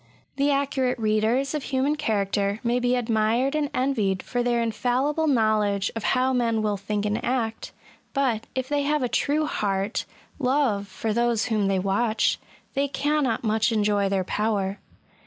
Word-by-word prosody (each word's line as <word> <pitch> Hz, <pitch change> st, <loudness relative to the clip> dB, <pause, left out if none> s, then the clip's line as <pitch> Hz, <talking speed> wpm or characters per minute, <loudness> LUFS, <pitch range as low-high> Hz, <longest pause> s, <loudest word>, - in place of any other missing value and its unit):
The 280 Hz, +1 st, +2 dB
accurate 275 Hz, -2 st, 0 dB
readers 225 Hz, +5 st, +1 dB
of 300 Hz, -2 st, -3 dB
human 275 Hz, +2 st, +1 dB
character 205 Hz, -6 st, 0 dB
may 240 Hz, +1 st, +1 dB
be 245 Hz, 0 st, +1 dB
admired 230 Hz, +2 st, +1 dB
and 300 Hz, -2 st, 0 dB
envied 220 Hz, -8 st, 0 dB
for 245 Hz, -, -2 dB
their 240 Hz, -1 st, +1 dB
infallible 255 Hz, +7 st, 0 dB
knowledge 215 Hz, -6 st, +2 dB
of 225 Hz, -, -4 dB
how 260 Hz, +1 st, +2 dB
men 230 Hz, -3 st, +1 dB
will 210 Hz, -1 st, +1 dB
think 205 Hz, +1 st, -3 dB
and 210 Hz, +1 st, -1 dB
act; 235 Hz, -3 st, -2 dB, 0.4 s
but, 245 Hz, -5 st, 0 dB
if 260 Hz, -1 st, -2 dB
they 290 Hz, 0 st, 0 dB
have 295 Hz, 0 st, 0 dB
a -, -, +1 dB
true 295 Hz, +5 st, +1 dB
heart 200 Hz, -5 st, -1 dB, 0.3 s
love 250 Hz, -7 st, +1 dB
for 210 Hz, +3 st, -3 dB
those 235 Hz, -1 st, +1 dB
whom 215 Hz, -4 st, +1 dB
they 195 Hz, -1 st, +1 dB
watch, 200 Hz, +4 st, +1 dB, 0.3 s
they 280 Hz, 0 st, +1 dB
cannot 280 Hz, -4 st, 0 dB
much 220 Hz, 0 st, +2 dB
enjoy 205 Hz, -2 st, +1 dB
their 195 Hz, -1 st, 0 dB
power. 200 Hz, 0 st, -1 dB
230 Hz, 160 wpm, -25 LUFS, 210-265 Hz, 0.4 s, The